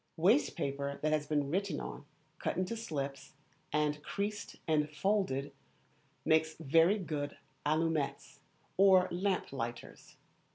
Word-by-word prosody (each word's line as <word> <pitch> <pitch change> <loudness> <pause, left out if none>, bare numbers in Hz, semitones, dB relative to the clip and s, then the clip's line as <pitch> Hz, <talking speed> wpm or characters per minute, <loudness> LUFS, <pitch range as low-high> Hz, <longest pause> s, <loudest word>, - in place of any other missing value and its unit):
Waste 205 - +4
paper 140 0 -2
that 155 - +2
has 150 -1 +1
been 145 -2 0
written 190 -3 0
on, - - -7 0.3
cut - - -2
into 185 +5 -1
slips, 140 -11 -4 0.4
and 150 0 +1
creased 205 +3 -3
and 150 -2 +2
folded, 150 -4 0 0.7
makes 160 0 +3
very 165 +6 +4
good 150 -6 -4 0.3
allumettes 155 -1 0 0.4
or 190 -1 +6
lamp 185 -3 -1
lighters. 120 -2 -6
160 Hz, 120 wpm, -33 LUFS, 145-190 Hz, 0.7 s, or